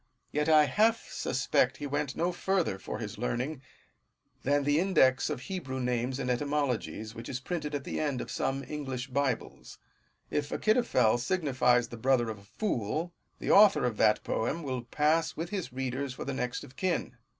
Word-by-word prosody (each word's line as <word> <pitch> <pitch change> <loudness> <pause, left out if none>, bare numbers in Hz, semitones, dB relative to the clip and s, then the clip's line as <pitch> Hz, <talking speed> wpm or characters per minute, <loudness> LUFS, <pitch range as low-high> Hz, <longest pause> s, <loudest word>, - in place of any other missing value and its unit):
Yet 150 +2 0
I 155 -1 +7
half 220 - +2
suspect 125 0 +1
he 145 - -5
went 145 -1 -2
no 175 +2 +1
further 180 - 0
for - - -5
his - - -6
learning, 130 - -2 0.8
than 145 +1 +2
the 145 +2 +3
index 135 -9 +3
of - - -3
Hebrew 130 -4 -4
names 125 +1 -1
and 130 - -3
etymologies, 125 -4 -1
which 115 0 -8
is 125 - -3
priuted 150 +1 -3
at 140 - -3
the - - -4
end 145 -4 -1
of - - -5
some 135 +1 -1
English 135 -4 -5
Bibles. 135 -2 -2 0.5
If 145 0 -1
Achitophel 215 - +2
signifies 125 -6 +2
the 120 - -8
brother 120 -1 +2
of 105 - -8
a - - -17
fool, 160 - -2 0.2
the - - -1
author 200 -8 +7
of 120 -4 -1
that 105 -1 +3
poem 145 +9 -1
will 130 -4 -3
pass 155 +6 +1
with 165 +2 -4
his 185 -10 -3
readers 130 +1 -3
for - - -6
the 140 - -2
next 125 -1 -3
of 130 - -13
kin. 170 -9 -1
135 Hz, 180 wpm, -30 LUFS, 125-155 Hz, 0.8 s, I